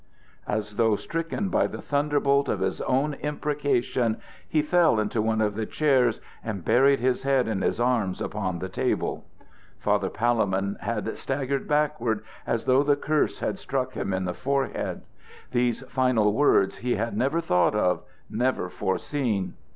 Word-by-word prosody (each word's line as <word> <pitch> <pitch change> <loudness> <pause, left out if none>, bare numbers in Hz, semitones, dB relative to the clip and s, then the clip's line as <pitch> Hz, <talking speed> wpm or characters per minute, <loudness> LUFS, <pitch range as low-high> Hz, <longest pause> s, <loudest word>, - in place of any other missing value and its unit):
As 105 -1 -3
though 115 -2 +4
stricken 165 - -3
by - - +2
the - - -7
thunderbolt 140 -1 +1
of - - -1
his - - -1
own 135 +3 +1
imprecation, 145 -6 0 0.3
he 155 -1 +2
fell 165 -6 +3
into 110 +1 0
one 110 0 +1
of 105 -1 +1
the 110 0 -3
chairs 130 -6 +2 0.2
and 100 -6 -5
buried 135 +2 +4
his 125 +1 +1
head 135 -2 +2
in 105 -4 -1
his - - 0
arms 120 -6 +1
upon 95 -2 -2
the 95 - -4
table. 95 - -1 0.5
Father - - +1
Palemon 100 -4 0
had 110 -1 -2
staggered 135 0 -2
backward, 150 -8 +1 0.2
as 115 - -1
though 130 +1 +4
the 145 0 +3
curse 150 +1 0
had - - -2
struck - - -2
him - - -3
in 95 0 -1
the 90 - -2
forehead. 135 +5 -2 0.5
These 120 -1 +1
final 125 -5 +2
words 125 -7 +3
he 125 0 -1
had 115 0 -2
never 135 +9 +1
thought 90 - +2
of 90 -4 +2 0.3
never 120 -5 0
foreseen. 105 0 -1
125 Hz, 160 wpm, -26 LUFS, 105-140 Hz, 0.5 s, though